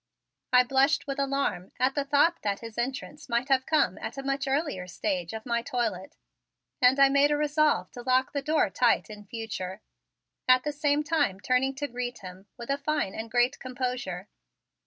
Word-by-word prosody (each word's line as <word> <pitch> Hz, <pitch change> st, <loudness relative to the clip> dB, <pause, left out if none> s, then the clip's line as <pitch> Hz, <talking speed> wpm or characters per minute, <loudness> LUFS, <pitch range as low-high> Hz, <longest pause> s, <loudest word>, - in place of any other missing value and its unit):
I 250 Hz, 0 st, +7 dB
blushed 270 Hz, +4 st, +2 dB
with 275 Hz, -1 st, -4 dB
alarm 275 Hz, -9 st, -1 dB
at 255 Hz, +1 st, +2 dB
the 285 Hz, -, 0 dB
thought 290 Hz, +4 st, +2 dB
that 200 Hz, -2 st, -2 dB
his 230 Hz, -1 st, -9 dB
entrance 265 Hz, +4 st, -4 dB
might 240 Hz, +3 st, 0 dB
have 260 Hz, -1 st, +2 dB
come 300 Hz, -, +2 dB
at -, -, -6 dB
a 275 Hz, -, -4 dB
much 275 Hz, +1 st, -1 dB
earlier 270 Hz, -, -1 dB
stage 180 Hz, -1 st, -2 dB
of 220 Hz, 0 st, -7 dB
my 235 Hz, -1 st, 0 dB
toilet 225 Hz, -6 st, -3 dB, 0.6 s
and 255 Hz, +2 st, +5 dB
I 275 Hz, -, +8 dB
made 280 Hz, +1 st, +4 dB
a 295 Hz, -, +2 dB
resolve 295 Hz, -, +1 dB
to 245 Hz, -, -9 dB
lock 255 Hz, +1 st, +2 dB
the 285 Hz, -, -1 dB
door 300 Hz, -7 st, +1 dB
tight 235 Hz, -1 st, +2 dB
in 210 Hz, -1 st, -10 dB
future, 200 Hz, -3 st, -5 dB, 0.7 s
at 255 Hz, 0 st, +6 dB
the 295 Hz, -, -1 dB
same 295 Hz, 0 st, +1 dB
time 300 Hz, -, 0 dB
turning 255 Hz, +4 st, +1 dB
to 290 Hz, +2 st, -3 dB
greet 245 Hz, -1 st, -4 dB
him 185 Hz, +1 st, -11 dB
with 235 Hz, +2 st, -5 dB
a 280 Hz, -, 0 dB
fine 285 Hz, -8 st, -1 dB
and 225 Hz, +1 st, -6 dB
great 245 Hz, +3 st, +2 dB
composure. 250 Hz, -8 st, -4 dB
255 Hz, 190 wpm, -28 LUFS, 225-280 Hz, 0.7 s, I